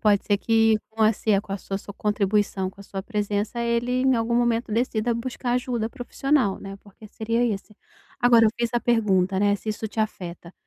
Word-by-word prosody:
Pode 205 -2 +3
ser 205 - +2
que 225 0 +3
com 220 0 -2
a 215 +1 +5
si 205 -1 +1
com 200 - -8
a 200 - -2
sua 195 0 -4 0.2
contribuição, 205 -2 0
com 195 - -17
a - - -11
sua 195 -1 -6
presença, 210 +1 -2
ele 235 +2 0
em 265 0 +4
algum 230 +1 0
momento 235 -1 +1
decida 230 0 0
buscar 245 +1 -3
ajuda 245 -2 -1
profissional, 250 -2 0
né, 195 0 -8
porque 210 +2 -16
seria 230 +3 -1
esse. 210 -2 -3 0.4
Agora, 240 -2 +6
eu - - +3
fiz 235 -1 0
a 240 - +1
pergunta, 195 -5 +2
né, 205 +1 +3
se 215 - -10
isso 215 +1 -2
te 220 - -3
afeta 175 -5 -5
220 Hz, 205 wpm, -24 LUFS, 200-235 Hz, 0.4 s, Agora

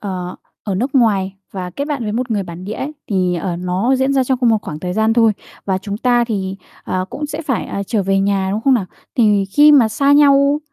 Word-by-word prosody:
ờ, 180 -3 -5 0.3
ở 200 - -2
nước 255 +9 -2
ngoài 200 -7 +2 0.2
và 185 -2 -5
kết 280 +11 -4
bạn 290 -4 -3
với 210 -2 -3
một 245 +2 -2
người 210 -3 0
bản 175 0 -9
địa 205 - -5
ấy, 270 +6 -4 0.2
thì, 185 -3 +1
ở, 175 0 -3
nó 185 +9 0
diễn 265 +1 +1
ra 265 -1 +2
trong 255 0 0
cùng 245 - +2
một 225 -1 +3
khoảng 150 - -6
thời 180 +1 -3
gian 220 +3 +2
thôi. 225 -1 +4 0.3
Và 190 -1 0
chúng 200 +1 -5
ta 240 0 +2
thì, 195 -4 -3 0.3
ờ, 185 0 -2
cũng 295 - -4
sẽ 295 - -5
phải, 265 -6 -2
à, 200 - -4
trở 215 -1 0
về 195 +1 +1
nhà, 195 -1 0
đúng 210 +2 -1
không 265 +3 +3
nào? 210 -7 0 0.3
Thì 210 -4 +3
khi 295 +10 +5
mà 260 -6 +6
xa 275 +6 +2
nhau, 285 0 +5
215 Hz, 250 wpm, -18 LUFS, 190-260 Hz, 0.3 s, mà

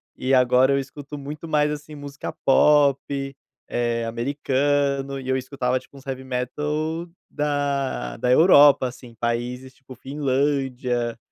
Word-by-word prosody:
e 130 +1 -1
agora 125 +1 +4
eu 140 - +2
escuto 140 +2 -8
muito 145 +3 -7
mais, 150 -1 +2
assim, 150 +1 -7
música 145 0 -7
pop, 140 0 +5 0.7
eh, 120 -1 -1
americana. 140 +3 0
E 130 - -10
eu 130 - +2
escutava 130 -1 -1
tipo 130 +2 -18
uns 135 - -15
heavy 130 -1 -5
metal 150 +6 -3 0.2
da 140 - -2
da 125 +3 -1
Europa, 145 -3 +6 0.3
países 120 +2 -3
tipo 130 -1 -14
Finlândia. 130 -3 -1
135 Hz, 125 wpm, -23 LUFS, 125-145 Hz, 0.7 s, Europa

